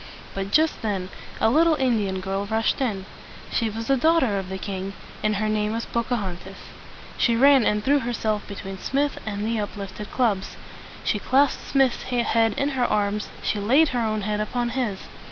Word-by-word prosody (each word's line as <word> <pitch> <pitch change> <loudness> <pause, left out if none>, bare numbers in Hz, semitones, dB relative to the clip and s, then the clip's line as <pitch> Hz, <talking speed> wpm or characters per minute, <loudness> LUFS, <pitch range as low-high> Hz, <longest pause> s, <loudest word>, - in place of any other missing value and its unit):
But 195 0 -3
just 310 +8 +2
then 195 -4 -2 0.3
a 220 - +3
little 320 +3 +4
Indian 215 -9 0
girl 195 +1 -2
rushed 220 +4 0
in. 205 -7 -1 0.5
She 230 - +1
was 225 +2 -5
the 275 - +3
daugh 325 +5 +4
ter 205 -6 +1
of 190 -1 -6
the 190 - -4
king, 195 0 -5 0.3
and 215 0 +1
her 215 +2 0
name 215 0 0
was 230 0 -2
Po 235 - -1
ca 245 +2 -1
hon´tas. 190 -1 -6 0.6
She 235 - +3
ran 270 +1 +6
and 210 0 +1
threw 285 +3 +4
herself 225 -4 -1
between 195 -1 -7
Smith 280 +6 -1
and 205 0 -2
the 225 0 0
up 205 0 -4
lift 200 +1 -7
ed 210 - -6
clubs. 215 -7 0 0.5
She 210 - 0
clasped 275 +6 +2
Smith's 270 -3 +2
head 230 -3 +1
with 280 - +1
her 255 -3 +1
arms. 210 -1 0
She 210 - 0
laid 270 +10 +4
her 245 - -1
own 215 -1 0
head 210 +1 -1
upon 240 +3 -1
his. 235 -6 -2
220 Hz, 200 wpm, -24 LUFS, 200-255 Hz, 0.6 s, ran